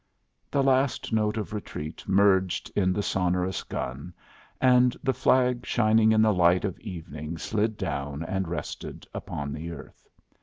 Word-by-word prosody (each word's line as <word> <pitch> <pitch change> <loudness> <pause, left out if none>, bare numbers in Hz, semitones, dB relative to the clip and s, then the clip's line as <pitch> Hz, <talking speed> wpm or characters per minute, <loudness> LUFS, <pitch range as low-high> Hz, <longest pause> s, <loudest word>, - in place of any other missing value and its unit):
The 140 - +1
last 135 -2 +1
note 105 0 +1
of 105 0 -4
retreat 80 -6 -6
merged 95 -1 +3
in 95 -2 +2
the 100 +2 -1
sonorous 90 0 0
gun, 70 +8 -6 0.4
and 125 -1 +4
the 130 - +2
flag 125 -2 +2
shining 110 -1 +3
in 110 0 +4
the 110 -1 +4
light 90 +1 +3
of 95 - -4
evening 80 -5 -7
slid 110 +4 -1
down 70 +2 -3
and 95 +2 -2
rested 85 +1 -6
upon 70 -1 -5
the 80 +2 -6
earth. 80 - -12
95 Hz, 150 wpm, -27 LUFS, 85-110 Hz, 0.4 s, and